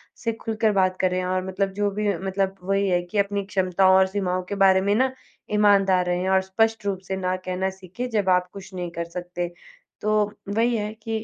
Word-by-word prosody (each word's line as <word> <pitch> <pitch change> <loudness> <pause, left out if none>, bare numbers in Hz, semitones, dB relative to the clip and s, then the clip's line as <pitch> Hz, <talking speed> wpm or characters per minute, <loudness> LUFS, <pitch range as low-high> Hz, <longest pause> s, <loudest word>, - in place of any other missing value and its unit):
से 230 - -2
खुलकर 225 -1 0
बात 185 -2 +2
करें 185 0 +1
और 185 0 -1
मतलब 195 +1 -1
जो 205 0 0
भी 210 +1 -2
मतलब 195 +1 -1
वही 195 +1 +1
है 175 -1 +2
कि 175 +4 -6
अपनी 200 0 0
क्षमताओं 190 -1 +3
और 190 0 +5
सीमाओं 185 -2 -1
के 200 - -2
बारे 190 -1 +6
में 200 +1 +2
ना 260 +3 +2 0.4
ईमानदार 195 -3 +4
रहें 180 +1 0
और 190 0 +4
स्पष्ट 220 +3 0
रूप 195 -2 -1
से 190 - -2
ना 185 0 -1
कहना 185 +1 -2
सीखें, 190 +6 -7
जब 205 -5 0
आप 180 0 +3
कुछ 195 -1 -10
नहीं 180 -1 -4
कर 170 0 -4
सकते। 175 0 -4 0.5
तो 215 0 +2 0.3
वही 235 +1 +2
है 210 0 -3
कि 220 0 -4
190 Hz, 210 wpm, -24 LUFS, 185-210 Hz, 0.5 s, बारे